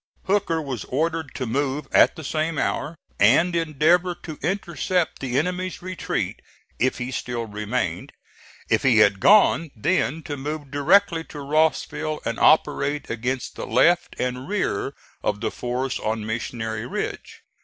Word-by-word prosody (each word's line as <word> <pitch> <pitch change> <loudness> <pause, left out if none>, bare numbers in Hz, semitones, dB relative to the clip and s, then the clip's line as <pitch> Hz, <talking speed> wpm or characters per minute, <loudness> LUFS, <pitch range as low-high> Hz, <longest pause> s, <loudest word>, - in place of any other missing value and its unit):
Hooker 190 -4 +1
was 135 -7 -4
ordered 160 +1 -2
to 130 - -3
move 135 +3 -1
at - - +5
the 160 - -8
same 155 +2 -1
hour, 150 +3 -1 0.2
and 160 - +4
endeavor 165 +3 +2
to 155 -3 -7
intercept 180 0 -1
the 130 -1 -2
enemy's 180 +3 -2
retreat 185 -1 -3 0.4
if 130 +2 +1
he 125 +1 -4
still 120 -2 -3
remained; 105 -3 -3 0.6
if - - +2
he 125 -4 +4
had 100 -2 +5
gone, 195 - +5
then 160 - 0
to 145 - -4
move 145 0 -5
directly 165 +4 +3
to 150 - -9
Rossville 155 +1 0
and 115 - -2
operate 150 -2 +2
against 125 +2 -3
the - - -6
left 170 +9 +3
and 125 +1 -2
rear 140 - -1 0.3
of 105 - -1
the 115 - -2
force 125 +2 -3
on 110 0 -2
Missionary 110 0 -3
Ridge. - - -5
145 Hz, 145 wpm, -23 LUFS, 125-165 Hz, 0.6 s, at